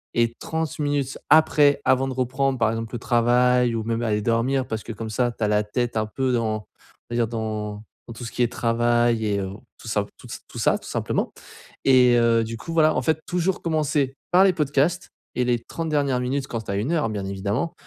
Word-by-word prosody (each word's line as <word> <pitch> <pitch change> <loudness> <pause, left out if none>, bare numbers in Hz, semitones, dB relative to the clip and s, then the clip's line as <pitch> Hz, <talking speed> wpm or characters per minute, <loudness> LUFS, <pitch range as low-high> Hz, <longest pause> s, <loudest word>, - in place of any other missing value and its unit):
et 115 0 +2
30 160 -2 -3
minutes 145 -2 -1
après, 150 -2 +5
avant 130 +1 +3
de - - -3
reprendre 130 +1 0
par 110 - +3
exemple 115 0 -5
le - - -4
travail 125 0 +3
ou 110 - -2
même 115 +1 -2
aller 105 -2 0
dormir, 125 +4 +1
parce 110 -1 -4
que - - -7
comme 110 +1 -6
ça, 120 +2 +1
tu 115 - -18
as 105 - +3
la 105 0 +2
tête 120 +2 -2
un 110 - +1
peu 130 +3 -1
dans, 115 -2 0
on 110 - -9 0.5
va - - -2
dire 115 -1 +2
dans, 110 -2 -4 0.2
dans 115 - -8
tout 120 +2 -9
ce 115 - -6
qui 125 - 0
est 120 - 0
travail 120 -1 +1
et, 100 -1 0
heu, 95 -1 -3 0.3
tout - - -12
ça 105 -2 0
tout - - -13
ç - - -7
tout - - -8
ça, - - +3
tout - - -11
simplement. - - -1 0.5
Et 125 -2 +6
heu, 115 -1 +3
du 115 +1 -5
coup, 165 - -8
voilà 155 -1 +4
en - - +1
fait, 160 -1 +1
toujours 180 +1 0
commencer 150 -4 0 0.2
par 185 +2 +6
les 190 - +4
podcasts 150 +2 0 0.3
et 125 - +2
les 120 -1 +1
30 160 +7 -5
dernières 140 -4 +1
minutes- 135 +2 -2
quand 115 -1 -4
tu 100 - -6
as - - -1
1 110 +10 -1
heure, 150 -9 +1
bien 100 -2 -4
évidemment- 100 - -2
120 Hz, 235 wpm, -23 LUFS, 115-140 Hz, 0.5 s, Et